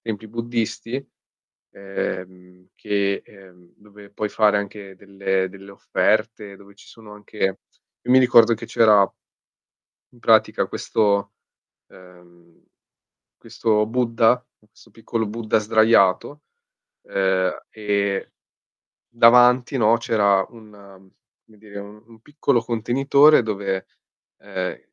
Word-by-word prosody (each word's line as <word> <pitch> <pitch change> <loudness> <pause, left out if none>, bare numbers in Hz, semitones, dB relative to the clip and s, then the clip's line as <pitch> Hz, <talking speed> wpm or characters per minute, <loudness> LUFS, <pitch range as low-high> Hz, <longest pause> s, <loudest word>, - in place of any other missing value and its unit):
templi 110 -1 -6
buddisti, 115 +3 -4 0.7
ehm, 90 -2 -7
che 100 -1 -2
ehm, 90 -3 -20
dove 105 -1 -17
puoi 105 0 -4
fare 105 -1 +2
anche 100 -1 -7
delle 95 -1 -3
delle 100 +1 -14
offerte, 105 0 -1
dove 100 0 -19
ci - - -19
sono 110 -2 -15
anche 105 +1 -16 0.7
io 125 - -1
mi 130 - +7
ricordo 120 -2 +5
che - - -9
c'era 105 -3 +4 1.1
in 120 - -20
pratica 110 -1 +2
questo 100 -2 -1 0.6
ehm, 90 -2 -20 0.7
questo 105 -2 -1
Buddha, 120 +1 +1
questo 105 0 -24
piccolo 115 -1 -4
Buddha 110 0 -1
sdraiato, 110 +4 +2 0.6
ehm, 95 -1 0 0.2
e 100 -2 -2 0.8
davanti, 125 +2 +4
no, 115 0 +3
c'era 100 -4 +1
una 105 -4 -16 0.5
come 110 -1 -23
dire, 100 -1 -12
u 105 +2 -13
un 115 -1 -19
piccolo 140 -3 -1
contenitore 135 +6 +3
dove 100 -3 -4 0.5
ehm, - - -5
105 Hz, 110 wpm, -21 LUFS, 100-115 Hz, 1.1 s, mi